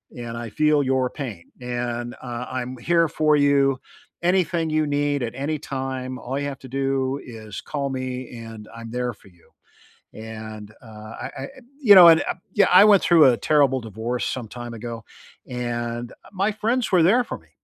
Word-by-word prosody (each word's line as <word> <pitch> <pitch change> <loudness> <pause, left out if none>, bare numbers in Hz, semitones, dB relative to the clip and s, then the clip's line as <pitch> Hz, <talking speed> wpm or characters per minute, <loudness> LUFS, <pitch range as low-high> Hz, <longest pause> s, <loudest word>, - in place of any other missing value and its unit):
and 120 -1 -6
I 120 -1 -6
feel 150 +4 +2
your 130 -1 +1
pain 115 - -8
and, 120 -1 -4
uh, 120 -1 -5
I'm 130 0 -4
here 165 +6 +2
for 155 -1 +2
you, 140 -2 +3 0.4
anything 175 -2 +1
you 155 0 +1
need 145 -1 0
at 120 +1 -4
any 145 +3 -2
time, 130 -1 -4
all 135 +3 -4
you 145 - -3
have 140 -1 -6
to 130 - -12
do 135 0 -1
is 110 -3 -8
call 140 -2 -3
me 130 -1 -4
and 115 -2 -10
I'm 115 -1 -9
there 125 0 -2
for 100 - -21
you," 85 -2 -26 0.6
and, 110 -1 -9
uh, - - -17 0.4
I - - -5
I - - -5
e - - -8 0.3
you 210 -7 +8
know, 180 -2 +11
and 165 -1 +7
uh - - -2 0.2
yeah 200 -3 +4
I 185 +3 +8
went 205 -3 +6
through 165 -3 +6
a 125 -3 +5
terrible 140 -4 +2
divorce 115 +3 -4
some 125 -3 -4
time 120 +1 -8
ago 115 0 -7 0.4
and, 120 -1 -4
uh, - - -18
my 195 +3 +1
friends 225 +3 -1
were 180 -3 +5
there 230 +9 +4
for - - -6
me, - - -24
130 Hz, 195 wpm, -23 LUFS, 120-150 Hz, 0.6 s, know